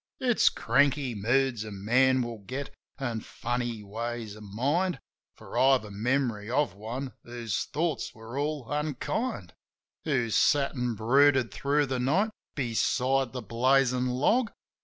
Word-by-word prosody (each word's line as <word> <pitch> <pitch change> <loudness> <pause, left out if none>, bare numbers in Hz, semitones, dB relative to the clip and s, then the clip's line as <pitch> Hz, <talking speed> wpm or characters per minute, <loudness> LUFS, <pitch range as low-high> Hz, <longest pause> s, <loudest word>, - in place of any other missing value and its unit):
It's 245 -3 +4
cranky 140 -2 +2
moods 120 +2 +1
a 110 - -7
man 125 +6 +3
will 120 -2 -6
get 130 +7 -6 0.2
an' 120 -5 -2
funny 120 -1 -3
ways 115 +1 -5
of 110 - -12
mind; 135 - 0 0.4
For - - -11
I've 135 -2 +4
a 105 - -10
memory 115 0 -1
of 130 -4 +1
one 120 +7 -6
whose 120 -2 -3
thoughts 155 -3 -2
were 115 +2 -10
all 145 -1 -2
unkind: 150 - -2 0.5
Who 130 -7 0
sat 140 +5 +3
an' 125 -3 -2
brooded 130 +3 +4
thro' 145 +1 +1
the 130 -2 -2
night 175 - +2 0.2
beside 130 0 +1
the 125 -1 -6
blazin' 125 +3 +2
log. 210 - +2
125 Hz, 140 wpm, -28 LUFS, 115-140 Hz, 0.5 s, It's